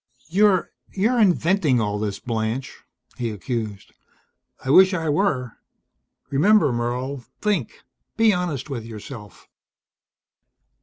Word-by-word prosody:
"You're 195 0 +3 0.2
you're 225 +6 +1
inventing 175 - +3
all 105 -1 -1
this, 105 -2 -2
Blanche," 115 +2 -3 0.4
he 120 -2 -2
accused. 105 -1 -5 0.7
"I 130 - +1
wish 190 +4 +7
I 160 -3 -2
were. 140 - 0 0.7
Remember, 160 +2 +4
Merle. 125 +3 -3 0.2
Think. 200 - -2 0.3
Be 225 -2 +5
honest 175 -8 -2
with 130 -5 -5
yourself." 110 -1 -10
135 Hz, 105 wpm, -23 LUFS, 115-185 Hz, 0.7 s, wish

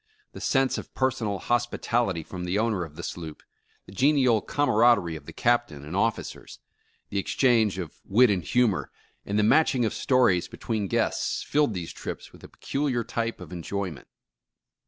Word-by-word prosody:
The - - -10
sense 135 -1 +1
of - - -10
personal 125 -6 0
hospitality 120 -5 0
from 90 +3 -7
the 90 +3 -1
owner 110 -4 0
of 80 -3 -10
the 85 - -8
sloop, 80 -3 -7 0.4
the - - -14
genial 130 0 +3
cam 145 0 0
araderie 105 -7 +4
of 80 - -10
the - - -7
Captain 120 -12 0
and 80 +5 -6
officers, 110 +3 -2 0.5
the 100 - 0
exchange 110 -2 +2
of 85 -5 -6
wit 120 +3 +4
and 95 -3 0
humor 125 -7 +1 0.4
and 100 - -1
the 105 - +3
matching 130 0 +4
of 110 - -1
stories 120 -9 +2
between 110 -4 -3
guests, - - 0
filled 145 -7 +1
these 85 -2 -5
trips - - -7
with - - -17
a - - -11
peculiar 135 -4 -2
type 115 0 -3
of 90 -2 -10
enjoy 95 +2 -3
ment. 75 - -12
110 Hz, 175 wpm, -26 LUFS, 90-120 Hz, 0.5 s, araderie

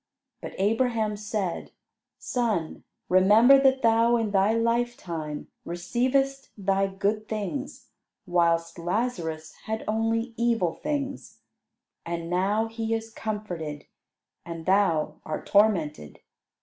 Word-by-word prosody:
But - - -7
Abraham 220 +1 +1
said, 205 -4 -3 0.5
"Son, 215 -10 -2 0.2
remember 215 +9 +6
that 265 -1 +3
thou 230 +1 +4
in 225 -3 -1
thy 195 +1 +3
lifetime 230 -10 -2 0.2
receivedst 260 +10 -1
thy 195 0 +1
good 200 +3 -2
things, 245 +7 -5 0.4
whilst 170 -1 +1
Lazarus 170 -5 -2
had 220 0 -3
only 225 +2 0
evil 230 -8 +1
things; 285 -2 -4 0.6
and 170 0 -4
now 200 +5 +1
he 225 0 -2
is 225 0 -5
comforted, 180 -10 -5 0.6
and 165 -1 -7
thou 190 -5 +2
art 155 - -5
tormented. 170 - +1
210 Hz, 105 wpm, -26 LUFS, 175-230 Hz, 0.6 s, remember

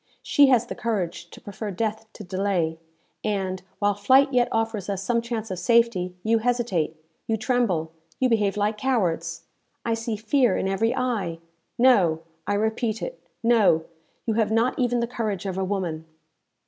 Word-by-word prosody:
She 285 -2 +5
has 245 -3 +4
the - - -5
courage 180 -6 -3
to - - -12
prefer 205 +1 -6
death 220 +3 -3
to 215 - -9
delay; 180 -4 -1 0.4
and, 190 -3 -1 0.2
while 205 0 +2
flight 265 +7 +4
yet 245 -1 +4
offers 225 -3 -1
us 195 -1 -2
some 235 +3 +1
chance 230 -3 -4
of 185 - -3
safety, 230 -6 +2
you 225 +1 +3
hesitate, 220 -10 0 0.3
you 225 - +1
tremble, 210 -9 0 0.3
you 260 - +3
behave 210 -4 +1
like 210 +1 0
cowards! 170 -10 0 0.4
I 230 - +1
see 225 0 -2
fear 225 +1 +2
in - - -1
every 225 +5 +1
eye! 225 -10 -1 0.4
No, 195 -11 +4 0.3
I 205 - +1
repeat 220 +1 -1
it - - -6 0.2
no, 215 -9 +4 0.4
you 225 - +1
have 215 -1 +1
not 230 +5 +1
even 245 -1 +1
the - - +1
courage 215 -5 -3
of 190 -2 -2
a 190 - -1
woman!" 180 -5 -2
215 Hz, 170 wpm, -25 LUFS, 190-235 Hz, 0.4 s, She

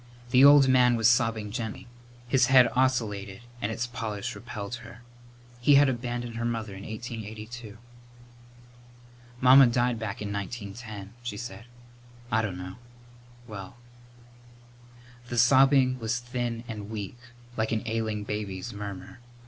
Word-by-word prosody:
The 130 +2 +6
old 140 -1 +8
man 125 -2 +5
was 115 -1 +3
sobbing 115 -3 +2
gently. 110 -2 -5 0.4
His 125 -1 +3
head 130 -2 +7
oscillated 110 -7 0 0.2
and 105 - -1
its 115 +2 -2
polish 115 -5 -4
repelled 110 -3 -7
her. 115 +1 -13 0.6
He 140 +4 +5
had 140 0 +6
abandoned 120 -1 -4
her 115 - -3
mother 115 -3 -3
in 95 - -9
1882. 110 0 -7 1.6
"Mamma 130 +1 +8
died 120 -1 +1
back 110 -3 -4
in 100 -1 -4
1910," 100 0 -7
she 120 -4 -5
said. 115 0 -8 0.7
"I 110 - +3
dunno 90 -2 -5 0.7
well 100 0 -9 0.7
" 120 0 -23
The 120 - -3
sobbing 130 +1 +5
was 115 +1 -1
thin 120 -1 -4
and 105 -3 -7
weak, 110 +2 -6 0.4
like 110 0 -1
an 110 -1 -1
ailing 110 -2 -2
baby's 105 0 -5
murmur. 100 -1 -8
115 Hz, 130 wpm, -27 LUFS, 105-120 Hz, 1.6 s, old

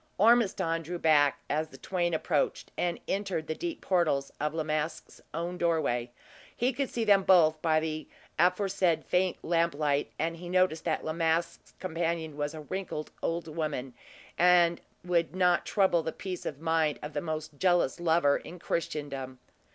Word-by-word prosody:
Ormiston 195 -6 +3
drew 175 +2 -5
back 145 -3 +3
as 155 +2 -1
the - - -14
twain 175 -3 -1
approached, 155 -2 -1
and 175 -1 -1
entered 195 -5 -2
the 160 - -2
deep 340 - -5
portals 155 -7 +1
of 150 0 0
La 160 - 0
Masque's 155 +1 -3
own 170 +3 -4
doorway. 145 -8 +1 0.5
He 250 +2 +1
could 275 +1 -2
see 235 - -2
them 200 -2 +5
both 160 -5 +5
by 160 -2 +3
the 155 0 -4 0.3
aforesaid 180 -1 +2
faint 180 0 +1
lamplight, 155 -4 +1
and 165 +1 -2
he 175 +1 -8
noticed 185 -3 +2
that 160 -2 -1
La 155 - -2
Masque's 165 +1 -1
companion 165 -3 -2
was 145 +1 -3
a 155 - -7
wrinkled 180 -2 -5
old 165 0 -2
woman, 150 -5 -3 0.5
that 175 -1 +5 0.3
would 175 -1 +1
not 180 -2 +2
trouble 190 -5 +3
the 160 - -3
peace 185 0 -6
of 140 - -5
mind 160 -2 +1
of 150 +1 -6
the 145 - -2
most 155 -2 -5
jealous 175 -5 +2
lover 165 -4 +3
in 180 - -10
Christendom. 145 -6 -4
165 Hz, 165 wpm, -29 LUFS, 155-180 Hz, 0.5 s, them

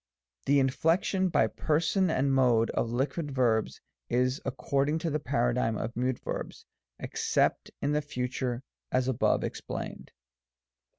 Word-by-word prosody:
The 140 +1 +5
inflection 165 +8 +2
by - - +3
person 170 +4 +1
and 135 -3 +1
mode 120 -4 +3
of 115 - -1
liquid 140 +6 -1
verbs 120 -5 +1 0.3
is 125 +2 +1
ac 135 - -2
cording 140 +4 +1
to 165 0 -2
the 150 - 0
paradigm 120 -4 0
of 115 +2 -4
mute 125 +1 0
verbs, - - -6 0.3
except - - 0
in 145 - +1
the 150 0 +2
future, 125 -3 -3 0.3
as 130 0 +1
above 130 -3 +2
explained. - - -5
130 Hz, 135 wpm, -29 LUFS, 125-150 Hz, 0.3 s, The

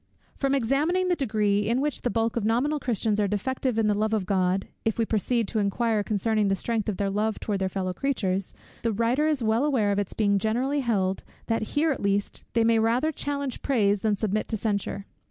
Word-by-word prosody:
From 275 -1 +1
examining 300 +9 +1
the 355 - +3
degree 210 -7 +1
in 240 +2 +2
which 290 0 -1
the 245 - 0
bulk 225 -1 0
of 235 - -1
nominal 250 +8 +1
Christians 220 -4 0
are 205 - +2
defective 250 +4 -1
in 225 - +2
the 210 - +3
love 215 +2 +1
of 205 -4 -1
God, 185 0 +1 0.2
if 225 - 0
we 230 - +2
proceed 225 +1 0
to 220 - -1
inquire 215 +2 +1
concerning 215 0 +1
the 195 - +2
strength 220 +1 -2
of 200 - -3
their 200 -1 0
love 210 +2 -1
towards 205 -2 -2
their 190 0 0
fellow 185 -1 -2
creatures, 195 -7 -1 0.3
the 230 - 0
writer 235 +8 +1
is 295 -6 0
well 225 +3 +2
aware 250 -9 +2
of 200 - +1
its 200 - -3
being 200 -2 +2
generally 250 +8 0
held, 195 -7 0 0.2
that 225 -1 0 0.2
here 315 +2 +3
at 275 - -3
least 200 0 -1
they 230 - +3
may 225 0 +4
rather 240 +8 +2
challenge 280 -3 -3
praise 210 -7 +2
than 210 0 +1
submit 215 +1 -1
to 220 - -2
censure. 200 -2 -2
220 Hz, 220 wpm, -26 LUFS, 200-250 Hz, 0.3 s, may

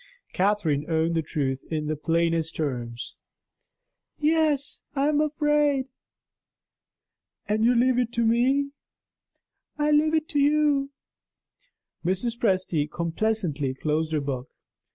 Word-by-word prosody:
Catherine 180 -7 +1
owned 160 +1 +1
the 165 - +1
truth 135 -3 -2
in 155 -1 -1
the 155 +1 -1
plainest 165 +1 0
terms: 120 -5 -4 1.0
"Yes, 305 -2 +1
I 275 +1 +2
am 300 0 +2
afraid." 295 -3 +1 1.6
"And 215 +1 0
you 245 +2 +4
leave 250 +1 +3
it 240 -2 0
to 235 -1 +1
me?" 265 +5 +2 1.1
"I 300 0 +1
leave 310 +1 +3
it 315 0 0
to 290 - 0
you." 290 -1 +3 1.1
Mrs. 190 +7 0
Presty 185 -9 0
complacently 170 -5 -1
closed 155 +3 -1
her 155 - +1
book. 135 -2 -4
210 Hz, 115 wpm, -25 LUFS, -, 1.6 s, you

